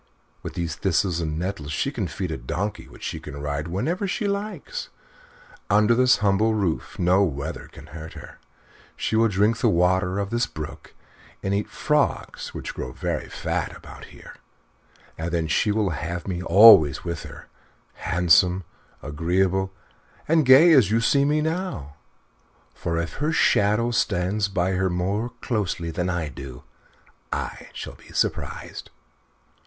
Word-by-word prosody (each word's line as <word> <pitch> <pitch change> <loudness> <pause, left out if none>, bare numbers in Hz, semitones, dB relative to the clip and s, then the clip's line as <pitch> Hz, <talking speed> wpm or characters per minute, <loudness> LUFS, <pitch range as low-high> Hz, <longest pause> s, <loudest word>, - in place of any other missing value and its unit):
With - - -7
these 85 -3 -3
thistles 90 -1 0
and 80 -2 -2
nettles 85 -4 -4
she 135 - -1
can 110 -10 -3
feed 90 +1 -4
a - - -2
donkey 90 +12 -4
which - - -14
she - - -4
can 70 - -9
ride 75 +1 -3
whenever 155 - -1
she 205 +3 -1
likes; 200 -4 -4 0.8
under 105 +3 +4
this 125 +2 +4
humble 105 +3 +3
roof 95 -6 -2
no 90 +2 +3
weather 70 -7 -4
can - - -13
hurt 80 0 -9
her; - - -12 0.6
she - - -2
will 115 +1 +4
drink 105 +3 +1
the - - +3
water 90 +2 +2
of 100 0 -2
this 120 +1 +1
brook 75 -1 -9 0.5
and 95 - -1
eat 100 +1 -1
frogs 150 -1 -1
which - - -6
grow 65 - -5
very - - -3
fat - - -3
about - - -12
here; - - -13 0.9
and 80 +2 -2
then 85 -2 0
she 105 - +2
will 105 -3 +1
have 85 +3 -4
me 90 -2 -3
always 90 - +7
with 85 -1 -4
her, - - -11 0.5
handsome, 90 +2 +3 0.4
agreeable, 90 +5 0 0.6
and 160 -3 +3
gay 140 +7 +8
as 130 -10 +6
you 110 +2 +2
see 140 +4 +3
me 150 +1 +2
now. 160 - -3 0.8
For 85 -1 -3
if 85 0 -3
her 150 +3 0
shadow 110 -5 +3
stays 100 -1 0
by 95 -1 0
her 95 0 +1
more 95 +6 -1
closely 95 -7 -2
than 90 +2 -2
I 90 -3 -1
do 65 -2 -9 0.7
I - - -4
shall - - -7
be - - -17
surprised." - - -3
95 Hz, 155 wpm, -24 LUFS, 85-115 Hz, 0.9 s, gay